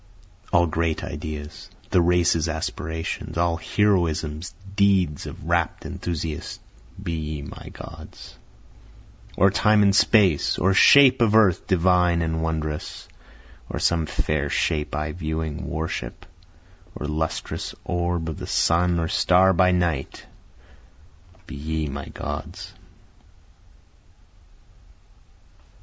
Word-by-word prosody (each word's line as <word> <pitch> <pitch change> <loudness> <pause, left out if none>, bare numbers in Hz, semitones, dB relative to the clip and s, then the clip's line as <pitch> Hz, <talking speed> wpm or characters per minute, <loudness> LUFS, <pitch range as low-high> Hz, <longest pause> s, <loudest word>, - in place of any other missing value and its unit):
All 85 0 +4
great 80 0 -1
ideas, 75 0 -7 0.2
the 90 - +4
races' 85 -1 +2
aspirations, 80 +1 -4
All 85 -1 +1
heroisms, 85 -5 0 0.2
deeds 95 -7 +2
of - - -9
rapt - - 0
enthusiasts, 80 -3 -5 0.4
Be 85 - -3
ye 80 -2 -4
my 70 - -10
Gods. - - -11 1.0
Or 95 +1 +5
Time 105 +1 +3
and 100 -1 +4
Space, 100 -9 +3
Or 95 +3 +2
shape 135 +5 +7
of 110 -2 +3
Earth 100 -6 +4
divine 90 -2 +3
and 80 0 -2
wondrous, 80 -2 -4 0.6
Or - - -4
some 80 -2 +1
fair 75 -1 -1
shape 75 0 -1
I 75 +1 -2
viewing, 80 -2 -4
worship, 75 -6 -5 0.7
Or - - -5
lustrous 80 +1 -3
orb 85 -1 -2
of 80 - -6
sun 85 +1 +2
or 80 - -1
star 95 +3 +4
by 90 +1 +4
night, 85 -6 -1 1.2
Be 75 - -10
ye 80 +2 -3
my 70 0 -6
Gods. - - -7
80 Hz, 110 wpm, -23 LUFS, 75-90 Hz, 1.2 s, shape